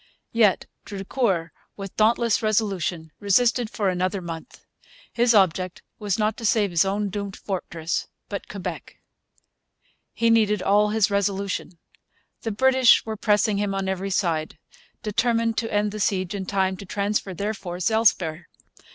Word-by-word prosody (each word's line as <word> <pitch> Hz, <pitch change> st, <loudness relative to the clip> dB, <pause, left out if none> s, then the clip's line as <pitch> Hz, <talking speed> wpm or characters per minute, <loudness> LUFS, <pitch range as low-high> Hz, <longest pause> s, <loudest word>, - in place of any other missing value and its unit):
Yet 215 Hz, -5 st, +3 dB, 0.2 s
Drucour, 195 Hz, -4 st, -1 dB, 0.3 s
with 195 Hz, -1 st, -7 dB
dauntless 230 Hz, +1 st, +3 dB
resolution, 195 Hz, -7 st, -1 dB
resisted 230 Hz, +3 st, +2 dB
for 205 Hz, -2 st, -2 dB
another 185 Hz, +2 st, 0 dB
month. 170 Hz, +4 st, -9 dB, 0.5 s
His 240 Hz, -1 st, +3 dB
object 185 Hz, -2 st, +2 dB, 0.2 s
was 205 Hz, -3 st, -1 dB
not 215 Hz, -1 st, +1 dB
to -, -, -9 dB
save 205 Hz, -2 st, +2 dB
his 170 Hz, -2 st, +4 dB
own 200 Hz, +1 st, -1 dB
doomed 200 Hz, 0 st, -4 dB
fortress 170 Hz, -4 st, -3 dB, 0.2 s
but 200 Hz, -, -6 dB
Quebec. 195 Hz, -3 st, -6 dB, 1.2 s
He 230 Hz, 0 st, +2 dB
needed 210 Hz, -3 st, +3 dB
all 210 Hz, +2 st, +3 dB
his 215 Hz, -1 st, +2 dB
resolution. 200 Hz, -2 st, -1 dB, 0.6 s
The 225 Hz, -, -3 dB
British 260 Hz, +2 st, +5 dB
were 220 Hz, -1 st, -4 dB
pressing 210 Hz, -1 st, +2 dB
him 200 Hz, -1 st, -1 dB
on 195 Hz, 0 st, -2 dB
every 190 Hz, +1 st, -2 dB
side, 165 Hz, -5 st, -1 dB, 0.5 s
determined 230 Hz, +1 st, +1 dB
to 225 Hz, 0 st, -4 dB
end 210 Hz, 0 st, +1 dB
the 215 Hz, -, -6 dB
siege 190 Hz, -3 st, 0 dB
in 195 Hz, -2 st, -4 dB
time 190 Hz, -1 st, 0 dB
to 200 Hz, -, -9 dB
transfer 200 Hz, -1 st, -1 dB
their 205 Hz, +5 st, -2 dB
force 180 Hz, -1 st, -3 dB
elsewhere. 185 Hz, -7 st, +1 dB
200 Hz, 145 wpm, -24 LUFS, 185-215 Hz, 1.2 s, British